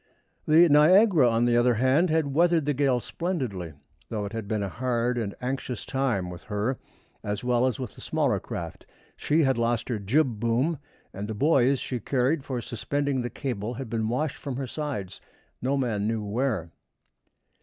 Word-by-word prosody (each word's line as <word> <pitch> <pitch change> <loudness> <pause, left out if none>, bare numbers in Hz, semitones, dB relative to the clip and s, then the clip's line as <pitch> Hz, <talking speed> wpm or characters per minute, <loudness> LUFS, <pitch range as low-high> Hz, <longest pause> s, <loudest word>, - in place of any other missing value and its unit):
The 165 +3 +7
Niagara, 160 - +6
on 115 +1 +2
the 120 -1 +3
other 120 0 +4
hand, 130 +9 +3
had 155 -3 +1
weathered 170 0 +3
the 145 - +1
gale 135 -2 +2
splendidly, 120 - -4 0.4
though 105 -2 -3
it 100 - -7
had 110 -3 -4
been 105 -1 -1
a - - -2
hard 120 +2 -1
and 110 -4 -3
anxious 125 -1 -4
time 120 -10 -1
with 90 - -9
her, 110 +5 -2 0.4
as 105 +1 -3
well 125 0 +2
as 130 +1 -2
with 125 -5 -5
the - - -14
smaller - - 0
craft. 85 -2 -7 0.3
She 155 +2 +2
had 135 -3 +2
lost 115 0 0
her 115 -4 -1
jib 120 +3 +1
boom, 125 +8 +1 0.3
and 100 +2 -5
the 110 - -4
buoys 135 +1 +3
she 125 -1 -4
carried 135 +6 0
for 130 -3 -3
suspending 140 +4 -2
the 120 - -3
cable 120 -4 -4
had 125 -3 -7
been 110 -1 -1
washed 135 +5 -1
from 135 -3 -5
her 135 +1 -3
sides 130 -8 -5 0.4
no 135 +3 0
man 110 -6 -1
knew 110 -1 -1
where. 105 -5 -1
125 Hz, 185 wpm, -26 LUFS, 110-140 Hz, 0.4 s, The